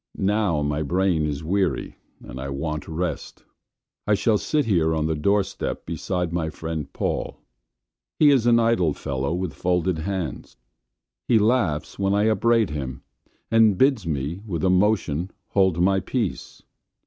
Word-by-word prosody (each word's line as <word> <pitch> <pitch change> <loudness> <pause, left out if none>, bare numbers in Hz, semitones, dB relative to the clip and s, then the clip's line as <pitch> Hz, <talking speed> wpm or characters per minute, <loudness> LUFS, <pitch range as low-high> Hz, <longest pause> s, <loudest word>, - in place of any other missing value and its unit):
Now 100 -6 +1
my 75 +1 -1
brain 85 0 +1
is 75 0 -4
weary 95 +3 -1 0.3
and 65 - -9
I 70 - -5
want 75 +3 -4
rest. 80 -1 -4 0.6
I 105 - +4
shall 105 0 +2
sit 150 -3 0
here 80 -6 +2
on 80 -1 0
the 80 - 0
door 100 +7 +2
step - - -5
beside 90 -3 -3
my 80 -2 -1
friend 80 -3 -5
Paul. - - -3 0.8
He 150 -2 +6
is 125 -4 +3
an 115 -1 +5
idle 115 -9 +2
fellow 70 0 -3
with 90 -2 -2
folded 90 +1 0
hands. 85 -8 -4 0.7
He 115 - +4
laughs 105 -10 +1
when 100 0 +1
I 105 - +2
upbraid 115 -1 +2
him, 65 -4 -5 0.5
and 110 -4 +5
bids 130 -7 +2
me, 75 +4 -3
with 85 -4 -3
a 95 - +3
motion, 95 -4 +1 0.2
hold 95 -4 +2
my 95 +2 +3
peace. 115 -2 -4
90 Hz, 155 wpm, -24 LUFS, 80-105 Hz, 0.8 s, He